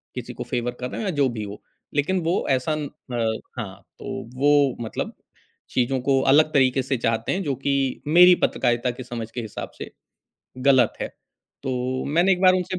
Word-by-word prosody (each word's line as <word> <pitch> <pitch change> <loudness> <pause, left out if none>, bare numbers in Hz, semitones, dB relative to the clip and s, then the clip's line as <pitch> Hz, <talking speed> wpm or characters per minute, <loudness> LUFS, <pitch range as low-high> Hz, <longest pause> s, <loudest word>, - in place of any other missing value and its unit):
किसी - - -6
को - - -5
फ़ेवर 120 0 -2
कर 125 0 -3
रहा - - -5
है - - -3
या 190 - 0
जो 135 - +4
भी 110 -3 -5
हो 100 0 -8 0.3
लेक़िन 170 +6 +1
वो 170 +3 +1
ऐसा 130 +4 +1
अ, - - -1 0.8
हाँ 100 -3 -6 0.2
तो 115 - -6
वो 145 -2 +4
मतलब 110 - -4 0.6
चीज़ों 130 +1 +1
को 135 0 +2
अलग 155 +1 +4
तरीक़े 130 -1 +3
से 135 +1 -1
चाहते 115 -1 0
हैं 190 +1 -2
जो 140 -3 -1
कि 140 -2 0
मेरी 180 +3 +8
पत्रकारिता 120 +1 0
के 125 +1 -8
समझ 120 -3 -6
के 120 - -4
हिसाब 110 -3 -7
से - - -7 0.7
ग़लत 130 -3 +4
है। - - -2 0.5
तो 130 -1 -2
मैंने 170 +6 +3
एक 180 - 0
बार 185 0 +7
उनसे 185 0 -2
130 Hz, 190 wpm, -24 LUFS, 120-155 Hz, 0.8 s, मेरी